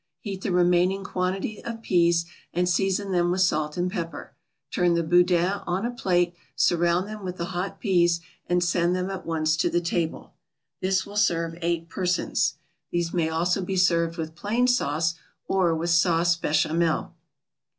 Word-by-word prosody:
Heat 195 0 -6
the 195 - -2
remaining 180 +2 +3
quantity 190 +3 -3
of 230 -1 -6
peas, 170 -3 +3 0.3
and 180 +1 +1
season 195 +2 0
them 175 -1 +2
with 185 +1 +1
salt 155 -4 +1
and 180 +1 0
pepper. 170 -5 -5 0.4
Turn 175 -1 +2
the 170 - +1
boudins 175 +3 +3
on 185 +5 -1
a 240 - -1
platter, 180 -7 +1 0.2
surround 175 +2 +2
them 215 -1 -8
with 185 -1 -5
the 170 - -2
hot 180 +3 -3
peas, 175 -5 +2 0.3
and 175 0 +2
send 175 +1 +1
them 185 +1 -2
at 190 -3 -6
once 155 -1 +1
to - - +1
the 175 - +1
table. 170 -1 -3 0.5
This 190 0 0
will 205 +1 -8
serve 170 -5 +1
eight 170 -1 -1
persons. 180 +1 0 0.3
These 170 -1 -1
may 165 -3 +1
also 175 +4 0
be 190 +1 -3
served 170 -2 +2
with 160 -1 -4
plain 215 +9 0
sauce, 165 - +1 0.3
or 180 -4 +2
with 170 +2 -1
Sauce 170 0 +3
Bechamel. 160 +1 0
175 Hz, 170 wpm, -25 LUFS, 170-190 Hz, 0.5 s, remaining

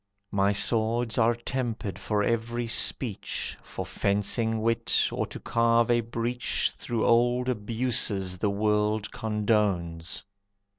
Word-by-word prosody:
My 100 0 +2
swords 115 +3 +1
are 115 +1 +4
tempered 115 -6 -4
for 105 +1 0
every 115 +2 -1
speech, 115 -1 0
For - - -6
fencing 110 +3 0
wit, 115 0 +1
or - - -2
to - - -8
carve 115 0 +2
a 120 - +4
breach 115 +1 -1
Through 115 -2 -2
old 120 +2 +3
abuses 105 -5 0
the 105 - +1
world 105 +1 0
condones. 100 -6 -1
110 Hz, 115 wpm, -27 LUFS, 105-120 Hz, -, are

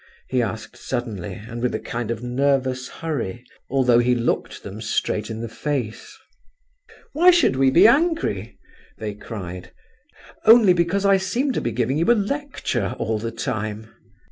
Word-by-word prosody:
he 130 -1 +1
asked 110 -1 -4
suddenly, 115 -8 -4
and 115 +2 -8
with 125 - 0
a - - -2
kind 120 -2 -4
of 115 0 -3
nervous 130 0 0
hurry, 125 -8 -4 0.2
although 125 -3 +4
he 125 +1 +3
looked 120 -1 -2
them 100 +2 -8
straight 105 0 -1
in 110 0 -5
the 115 - -4
face. 125 -2 -4 1.0
"Why 340 +5 +6
should 345 - +4
we 135 0 +4
be 170 +9 +6
angry?" 235 - +2 0.4
they 105 -1 -4
cried. 95 -4 -8 0.7
"Only 220 -4 +7
because 175 +3 0
I 195 0 +5
seem 235 +9 -1
to - - -1
be 120 - -2
giving 125 +5 0
you 170 +8 +3
a - - +6
lecture, 205 - -2
all 110 -1 -1
the 115 +2 -3
time!" 110 0 -4
125 Hz, 160 wpm, -22 LUFS, 110-170 Hz, 1.0 s, Only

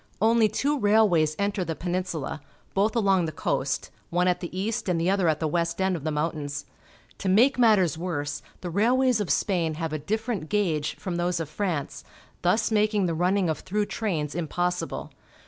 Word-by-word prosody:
Only 225 0 +4
two 290 +5 0
railways 205 -8 +3
enter 200 -1 0
the 165 -2 -3
Peninsula, 175 -4 -3 0.3
both 205 +4 +1
along 195 -6 +3
the 160 - -3
coast, 135 -2 -2 0.2
one 180 +1 +1
at 180 -1 +2
the 180 +1 -5
east 215 0 -2
and 175 -2 +1
the 170 +3 +2
other 195 -3 +2
at 155 -1 +2
the 160 - 0
west 170 +2 -1
end 190 -1 +1
of 160 - -6
the 155 - -1
mountains. 150 -1 -3 0.5
To 190 - -1
make 245 +8 +4
matters 190 - +4
worse, 145 -5 -3 0.2
the 175 - -4
railways 245 +5 +3
of 200 - -3
Spain 170 -5 +1
have 160 -1 -3
a 155 - -2
ditierent 215 - -3
gauge 165 -8 0
from 180 -3 -4
those 175 0 0
of 160 -3 -4
France, 170 -5 -3 0.4
thus 215 +6 +2
making 210 -2 +2
the 170 - 0
running 180 +3 +1
of 160 - -1
through 210 +2 -1
trains 165 -11 -2
impossible. 175 +2 -2
180 Hz, 185 wpm, -26 LUFS, 160-205 Hz, 0.5 s, Only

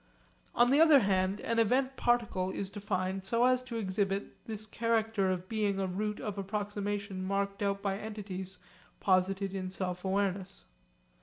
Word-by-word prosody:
On 240 +1 +5
the 285 +3 +6
other 310 -4 +8
hand 190 0 +1
an 230 0 0
event 260 +4 +2
particle 230 -8 +1
is 190 0 -4
defined 190 -2 -2
so 230 +5 +2
as 255 0 +4
to 255 -2 -7
exhibit 195 -1 -1
this 215 -1 -5
character 225 -2 +1
of 185 0 -2
being 205 -2 0
a 195 - +1
route 210 +3 -2
of 205 -2 -4
approximation 205 -1 -3
marked 200 +1 -1
out 200 -1 0
by 195 -1 -1
entities 190 -4 -6 0.4
posited 190 0 +2
in 185 -1 -3
sense 180 -1 -3
awareness. 190 - -1
200 Hz, 155 wpm, -31 LUFS, 190-220 Hz, 0.4 s, other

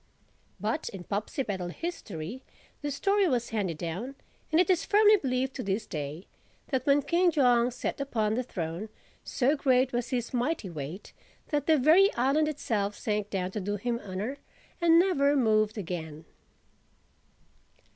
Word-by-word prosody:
But 215 +4 -2
in 195 -3 -8
Popsipetel 200 - -3
history 220 - -6 0.4
the 290 - -2
story 395 +7 +2
was 245 -6 0
handed 195 -8 -2
down 185 - -5 0.4
(and 315 - +4
it 360 - +4
is 350 -2 +2
firmly 425 0 +6
believed 260 -4 -1
to 255 - -3
this 200 +3 -1
day) 150 +2 -5 0.4
that 265 0 -1
when 285 0 +4
King 350 +5 +3
Jong 245 -6 +3
sat 250 +3 -4
upon 220 -6 0
the 245 - 0
throne, 180 -3 -5 0.3
so 270 +3 +1
great 260 -2 +2
was 240 -1 -1
his 245 -1 -2
mighty 245 - -1
weight, 155 +5 -7 0.4
that 290 -2 -1
the 320 -1 +5
very 325 +9 +6
island 275 +5 +2
itself 215 -9 -1
sank 210 -1 -2
down 185 -2 -2
to 210 - -3
do 205 +2 -2
him 235 +3 -2
honor 205 +8 -4 0.4
and 335 -1 +6
never 300 -6 +3
moved 215 -4 +2
again. 160 -5 -5
240 Hz, 155 wpm, -28 LUFS, 200-285 Hz, 0.4 s, firmly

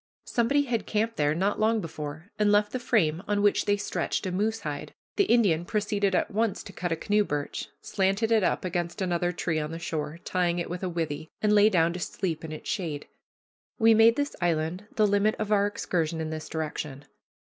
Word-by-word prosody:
Somebody 275 +4 +2
had 240 -5 -2
camped 225 +2 0
there 150 0 +2
not 195 +4 0
long 220 +1 +3
before 155 0 -7
and 210 -1 +4
left 210 0 +3
the 255 - -2
frame 175 -10 +1
on 205 -1 +1
which 205 - +3
they 205 0 +2
stretched 205 - -2
a 185 - -1
moose 220 +4 0
hide. 145 -1 -5 0.2
The 400 - +3
Indian 200 - +3
proceeded 205 0 0
at - - 0
once 220 0 0
to 195 - -11
cut 175 -1 -3
a - - +2
canoe 210 +5 +2
birch, 145 -6 -4
slanted 195 +3 0
it 220 -3 +4
up 185 - 0
against 175 -1 -2
another 175 -2 0
tree 165 -2 -1
on 150 0 -3
the 165 - -5
shore, 160 -2 -4
tying 175 -1 +1
it 170 -1 -3
with 180 - -4
a 185 - -2
withe, 160 -2 -3 0.2
and 210 0 +4
lay 210 0 +6
down 170 -4 +2
to 180 - -5
sleep 175 -3 -3
in 160 - -6
its 155 - -8
shade. 165 -8 -3 0.7
We 225 -1 +6
made 225 +1 +6
this 285 +1 -2
island 170 +3 -1
the 215 - +4
limit 205 +1 +2
of 215 -1 -3
our 205 -1 +4
excursion 165 -5 -2
in 160 0 -3
this 155 0 -6
direction. 150 -3 -4
185 Hz, 210 wpm, -27 LUFS, 160-210 Hz, 0.7 s, lay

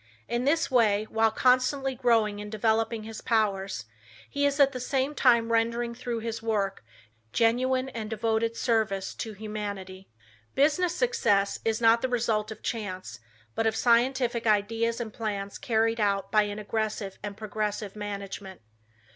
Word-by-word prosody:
In 240 +2 -1
this 320 +1 +2
way, 215 -4 +3
while 225 0 +3
constantly 255 +3 +2
growing 225 -5 +2
and 210 0 -8
developing 225 +1 0
his 220 0 -8
powers, 195 - 0 0.4
he 285 0 +1
is 285 +1 -2
at 275 -1 +6
the 255 - -5
same 265 +3 -1
time 235 -5 +3
rendering 235 +1 +1
through 235 -1 -4
his 225 0 -4
work, 205 - -1 0.5
genuine 255 +3 +2
and 225 -4 -5
devoted 225 +1 0
service 215 -5 0
to 220 -2 -6
humanity. 200 -3 -6 0.5
Business 330 +5 +2
success 210 - +1
is 225 -1 0
not 230 0 +5
the 260 - -1
result 225 -3 0
of 220 - -9
chance, 185 - -4 0.3
but 225 - 0
of 220 - 0
scientific 240 0 +2
ideas 225 +3 +1
and 225 -3 -5
plans 200 -3 -4
carried 225 0 +1
out 200 -2 0
by 215 -1 +4
an 205 - -5
aggressive 215 -2 -3
and 205 0 -6
progressive 210 -1 -3
management. 200 -2 -6
225 Hz, 150 wpm, -27 LUFS, 210-240 Hz, 0.5 s, at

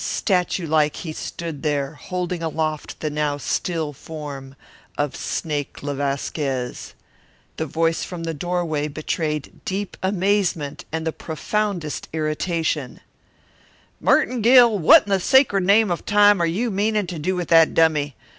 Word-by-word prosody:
Statute 180 -3 0
like 150 -1 +2
he 160 -3 -6
stood 165 -2 -6
there, 145 -2 -1
holding 180 +2 -4
aloft 155 -2 -3
the 155 - -2
now 150 -1 -1
still 160 0 -2
form 140 -2 -8 0.4
of 145 -1 -1
Snake 145 -4 -4
le 145 0 -2
Vasquez. 135 -2 -3 0.6
The 160 - -2
voice 165 +2 0
from 175 -2 -6
the 165 0 -3
doorway 160 -2 -2
betrayed 150 0 -4
deep 195 +1 -3
amazement 190 -6 0
and 160 0 -3
the 160 - 0
profoundest 175 -1 -3
irritation: 155 -2 -2 1.0
"Merton 250 -1 +2
Gill, 235 -2 +6
what 160 - +7
in 205 - -7
the 195 - +3
sacred 210 -4 +4
name 205 +1 +4
of 175 - -2
Time 205 -2 +5
are 170 - +2
you 215 +8 -1
meanin' 210 +1 +1
to 175 -2 -6
do 185 +5 -1
with 175 -2 -3
that 165 -1 +5
dummy? 150 -4 +2
165 Hz, 145 wpm, -22 LUFS, 150-190 Hz, 1.0 s, what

